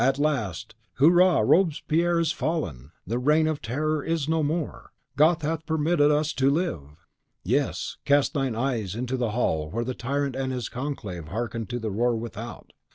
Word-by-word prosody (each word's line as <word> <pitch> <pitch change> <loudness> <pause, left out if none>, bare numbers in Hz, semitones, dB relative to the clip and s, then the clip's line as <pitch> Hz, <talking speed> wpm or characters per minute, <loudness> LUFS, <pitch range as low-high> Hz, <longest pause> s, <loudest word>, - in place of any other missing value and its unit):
at 135 +1 +3
last, 135 - -1 0.2
"Hurrah! 175 +4 +5
Robespierre 170 -1 +2
is 165 -2 +1
fallen! 80 - -3
The 120 +2 -2
Reign 150 +5 +3
of 155 -2 -1
Terror 150 +5 -1
is 165 -3 -1
no 160 0 +1
more! 155 +1 -3 0.2
God 160 +2 +4
hath 160 +1 -2
permitted 160 -1 +2
us 150 +1 +1
to 135 0 +2
live!" 85 - -3 0.4
Yes; - - -1
cast 145 +1 +3
thine 135 -6 -1
eyes 115 -6 -1
into 125 +2 -2
the 120 -3 -1
hall 80 -9 0
where 115 +7 -2
the 130 - -2
tyrant 140 +2 -2
and 130 0 -2
his 125 -3 -3
conclave 105 - -5
hearkened 115 +4 -4
to 120 - -2
the 110 -3 -3
roar 120 +4 +1
without! 115 0 -7
135 Hz, 170 wpm, -26 LUFS, 115-155 Hz, 0.4 s, Hurrah